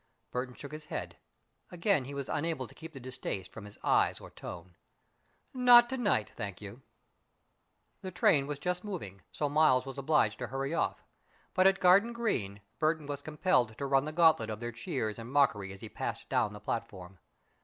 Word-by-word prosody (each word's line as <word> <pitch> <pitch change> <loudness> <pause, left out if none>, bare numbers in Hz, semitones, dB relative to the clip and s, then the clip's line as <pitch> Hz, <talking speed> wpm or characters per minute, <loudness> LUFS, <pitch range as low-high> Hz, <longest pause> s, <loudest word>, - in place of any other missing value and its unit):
Burton 125 0 -3
shook 140 - -9
his 155 0 -8
head. - - -6 0.5
Again 175 -5 +1
he 140 +2 -7
was 140 -1 -4
unable 150 -3 -2
to - - -14
keep 160 0 -10
the 140 - -9
distaste 120 -7 -5
from 115 - -9
his 105 - -13
eyes - - +2
or - - -12
tone. 85 0 -9 0.8
"Not 245 -1 +7
to 265 - -1
night, 200 - +1
thank 100 -5 -5
you." 105 +5 -10 1.2
The 190 - -5
train 150 -5 +3
was 145 -1 -3
just 180 +4 -2
moving, 130 - -6
so 150 - -1
Miles 145 -3 +4
was 135 0 -6
obliged 135 -7 +2
to - - -3
hurry 135 +3 -3
off, - - -1 0.5
but 185 +1 +5
at 195 0 +3
Garden 195 +6 +5
Green, 110 - -2 0.2
Burton 155 -1 +1
was 145 -1 -5
compelled 145 - +1
to 140 - -3
run 135 0 +2
the 155 - -4
gauntlet 160 -9 +4
of 105 -1 -4
their 120 0 -4
cheers 110 -1 -3
and 115 +2 -8
mockery 115 -9 +2
as 95 - -11
he - - -7
passed - - -5
down 105 - +1
the 105 - -9
platform. 95 -4 -5
140 Hz, 190 wpm, -31 LUFS, 110-165 Hz, 1.2 s, Not